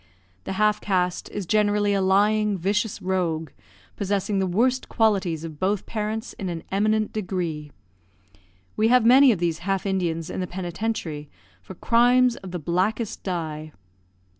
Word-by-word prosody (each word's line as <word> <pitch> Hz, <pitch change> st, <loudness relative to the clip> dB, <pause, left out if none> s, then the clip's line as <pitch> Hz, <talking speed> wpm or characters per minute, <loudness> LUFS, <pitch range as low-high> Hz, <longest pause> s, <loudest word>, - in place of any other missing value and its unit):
The -, -, -3 dB
half 210 Hz, +2 st, +2 dB
caste 180 Hz, -3 st, -1 dB
is 205 Hz, -2 st, -5 dB
generally 205 Hz, +1 st, +2 dB
a 195 Hz, -, +1 dB
lying, 205 Hz, +2 st, +2 dB
vicious 205 Hz, +4 st, -1 dB
rogue, 170 Hz, -5 st, -1 dB, 0.4 s
possessing 200 Hz, 0 st, -1 dB
the 190 Hz, -, +1 dB
worst 245 Hz, +8 st, +1 dB
qualities 190 Hz, -8 st, +1 dB
of 160 Hz, -3 st, -8 dB
both 195 Hz, +1 st, 0 dB
parents 220 Hz, 0 st, -4 dB
in 190 Hz, -, -3 dB
an 170 Hz, -2 st, -5 dB
eminent 215 Hz, +2 st, +1 dB
degree. 175 Hz, -7 st, -3 dB, 1.0 s
We 215 Hz, -, +2 dB
have 250 Hz, -1 st, +4 dB
many 260 Hz, +2 st, +7 dB
of 215 Hz, -, 0 dB
these 170 Hz, -1 st, -1 dB
half 195 Hz, +2 st, -2 dB
Indians 170 Hz, -4 st, -1 dB
in -, -, -4 dB
the 180 Hz, -, -2 dB
penitentiary, 175 Hz, -4 st, -4 dB, 0.3 s
for 90 Hz, -, -11 dB
crimes 245 Hz, +1 st, +3 dB
of 190 Hz, -, -9 dB
the 180 Hz, -, -4 dB
blackest 190 Hz, +7 st, -1 dB
dye. 155 Hz, -4 st, -4 dB
195 Hz, 150 wpm, -24 LUFS, 175-215 Hz, 1.0 s, many